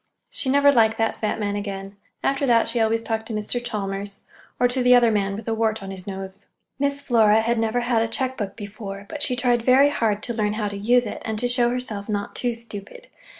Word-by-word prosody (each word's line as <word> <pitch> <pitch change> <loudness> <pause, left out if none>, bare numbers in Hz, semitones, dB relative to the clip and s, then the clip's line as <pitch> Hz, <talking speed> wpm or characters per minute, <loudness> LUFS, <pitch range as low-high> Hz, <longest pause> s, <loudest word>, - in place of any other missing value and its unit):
She 265 - -1
never 285 +1 +5
liked 225 -4 +3
that 225 0 0
fat 215 0 -1
man 205 -1 -1
again. 195 -1 -5 0.3
After 275 0 +1
that 230 -2 +4
she 235 +1 -1
always 225 0 +1
talked 225 -1 -3
to 225 - -4
Mr. 215 +3 -2
Chalmers, 200 -2 -4 0.4
or 245 - +5
to 250 +1 -1
the 250 0 +6
other 240 -2 +5
man 200 -2 0
with 215 +2 -8
a 225 - 0
wart 220 -2 0
on 195 - -6
his 190 0 -9
nose. 195 0 -7 0.3
Miss 280 0 0
Flora 220 -4 +4
had 235 +1 0
never 225 +2 0
had 240 -2 +1
a 225 - +1
check 255 +3 -2
book 200 -4 -4
before, 205 -1 -8
but 300 - -6
she 250 - +1
tried 245 -1 +2
very 265 +4 +5
hard 215 -7 0
to 235 - -3
learn 210 -2 0
how 210 -1 -2
to 205 - -7
use 240 +5 +3
it, 210 - -6
and 220 -1 -3
to 245 +3 0
show 245 -1 +3
herself 230 -5 -4
not 205 -1 -2
too 245 -2 -1
stupid. 230 - -10
225 Hz, 235 wpm, -23 LUFS, 205-245 Hz, 0.4 s, the